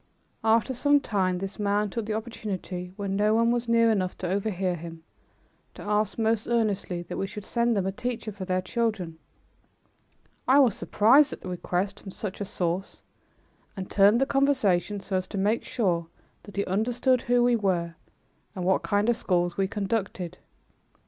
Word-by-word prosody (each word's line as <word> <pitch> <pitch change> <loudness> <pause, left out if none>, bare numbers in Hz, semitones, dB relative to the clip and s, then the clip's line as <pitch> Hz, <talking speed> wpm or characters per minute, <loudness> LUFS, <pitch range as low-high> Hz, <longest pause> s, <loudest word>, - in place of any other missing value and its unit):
After 225 +3 +3
some 285 +3 +3
time, 190 -8 0
this 195 +3 -6
man 205 0 +1
took 225 -1 -3
the 215 - -1
opportunity, 195 -5 -5
when 200 -1 -3
no 210 +2 +3
one 230 +1 +3
was 240 0 -1
near 230 -1 +4
enough 185 -4 -1
to 185 - -4
overhear 190 -1 -1
him, 165 -1 -9 0.7
to - - -9
ask 210 0 0
most 225 -1 +1
earnestly 205 -6 0
that 175 - -6
we 195 - -1
should 210 0 -8
send 235 -2 +1
them 190 - 0
a 195 - 0
teacher 225 +1 -4
for 195 -1 -7
their 185 0 -1
children. 185 -6 -2 1.3
I 265 - +6
was 260 -7 +5
surprised 270 +8 +4
at - - -9
the 185 - -7
request 180 +2 -2
from 195 - -10
such 195 +1 -6
a - - -1
source 180 0 -3 0.7
and 190 -1 -6
turned 205 +3 +5
the 270 - +3
conversation 220 -9 +1
so 190 -1 -2
as 185 0 -3
to 205 - -6
make 210 +4 +1
sure 175 -7 0 0.4
that 205 - -12
he 200 - 0
understood 245 +6 +1
who 245 0 +2
we 245 0 +4
were 180 -6 0 0.6
and 180 -2 -3
what 190 - +3
kind 205 +1 +1
of 240 - +3
schools 175 -4 0
we 195 -1 +1
conducted. 195 -4 -3
205 Hz, 180 wpm, -27 LUFS, 185-230 Hz, 1.3 s, I